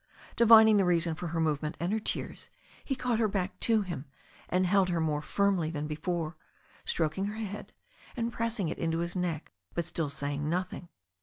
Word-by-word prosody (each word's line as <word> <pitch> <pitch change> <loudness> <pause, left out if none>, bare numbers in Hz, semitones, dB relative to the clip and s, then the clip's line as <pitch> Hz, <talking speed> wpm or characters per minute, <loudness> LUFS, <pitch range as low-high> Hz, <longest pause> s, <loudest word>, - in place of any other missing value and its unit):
Divining 220 -2 +8
the 195 - +4
reason 170 -2 +3
for 175 +2 -5
her 165 0 -2
movement 155 -1 0
and 175 +4 -1
her 220 - +1
tears, - - -3 0.3
he 270 - -2
caught 245 -3 0
her 225 - +3
back 195 -2 -2
to 225 -2 +3
him, 175 -7 -5 0.4
and 185 +1 +2
held 190 0 +3
her 175 -1 0
more 155 -2 0
firmly 195 -2 +1
than 150 -2 -3
be 150 - -3
fore, 165 0 -2 0.5
stroking 165 +4 0
her 210 +1 -4
head, 210 -2 -6 0.5
and 235 0 -1
pressing 230 -6 -1
it 155 - -4
into 165 0 0
his 170 +2 -2
neck, 175 -4 -2 0.2
but 170 - -1
still 165 -2 -1
saying 145 +1 -2
nothing. 180 0 -3
175 Hz, 190 wpm, -30 LUFS, 160-205 Hz, 0.5 s, Divining